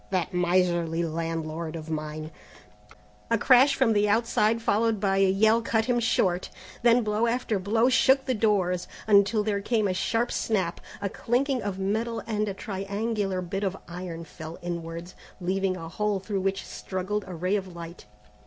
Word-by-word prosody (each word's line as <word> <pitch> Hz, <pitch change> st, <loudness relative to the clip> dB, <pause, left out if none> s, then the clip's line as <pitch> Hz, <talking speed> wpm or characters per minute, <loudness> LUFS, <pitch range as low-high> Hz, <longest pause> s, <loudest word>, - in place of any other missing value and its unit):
"That 185 Hz, -2 st, -1 dB
miserly 175 Hz, -2 st, +1 dB
landlord 165 Hz, 0 st, -3 dB
of 160 Hz, 0 st, -7 dB
mine 155 Hz, 0 st, -4 dB, 0.5 s
" -, -, -25 dB
A 230 Hz, -, +3 dB
crash 260 Hz, +4 st, +5 dB
from 245 Hz, -4 st, +3 dB
the 210 Hz, 0 st, +2 dB
outside, 225 Hz, 0 st, +2 dB
followed 225 Hz, -1 st, +1 dB
by 195 Hz, -1 st, +1 dB
a 195 Hz, -1 st, +4 dB
yell, 220 Hz, +4 st, +4 dB
cut 225 Hz, -1 st, +1 dB
him 245 Hz, 0 st, +1 dB
short; 185 Hz, -5 st, +1 dB, 0.3 s
then 240 Hz, 0 st, +5 dB
blow 215 Hz, +2 st, +1 dB
after 230 Hz, -3 st, 0 dB
blow 225 Hz, +5 st, +2 dB
shook 265 Hz, +1 st, +4 dB
the 260 Hz, -, +1 dB
doors, 195 Hz, -5 st, +1 dB, 0.2 s
until 210 Hz, +1 st, +4 dB
there 205 Hz, -1 st, -1 dB
came 215 Hz, 0 st, +1 dB
a 185 Hz, -, 0 dB
sharp 230 Hz, +5 st, 0 dB
snap, 190 Hz, -6 st, -1 dB, 0.2 s
a -, -, +1 dB
clinking 255 Hz, +5 st, 0 dB
of 200 Hz, -2 st, -3 dB
metal 220 Hz, +4 st, -1 dB
and 215 Hz, -2 st, -1 dB
a 195 Hz, -, -5 dB
triangular 200 Hz, -1 st, -2 dB
bit 195 Hz, +3 st, -3 dB
of 195 Hz, -1 st, -1 dB
iron 175 Hz, -1 st, -6 dB
fell 160 Hz, +1 st, -9 dB
inwards, 170 Hz, 0 st, -5 dB, 0.3 s
leaving 185 Hz, +1 st, 0 dB
a 165 Hz, -2 st, -7 dB
hole 210 Hz, +4 st, -1 dB
through 195 Hz, 0 st, -3 dB
which 195 Hz, 0 st, -1 dB
struggled 190 Hz, +2 st, -3 dB
a 185 Hz, -, -6 dB
ray 180 Hz, +4 st, 0 dB
of 190 Hz, -3 st, -4 dB
light. 170 Hz, -8 st, -9 dB
195 Hz, 170 wpm, -27 LUFS, 175-225 Hz, 0.5 s, crash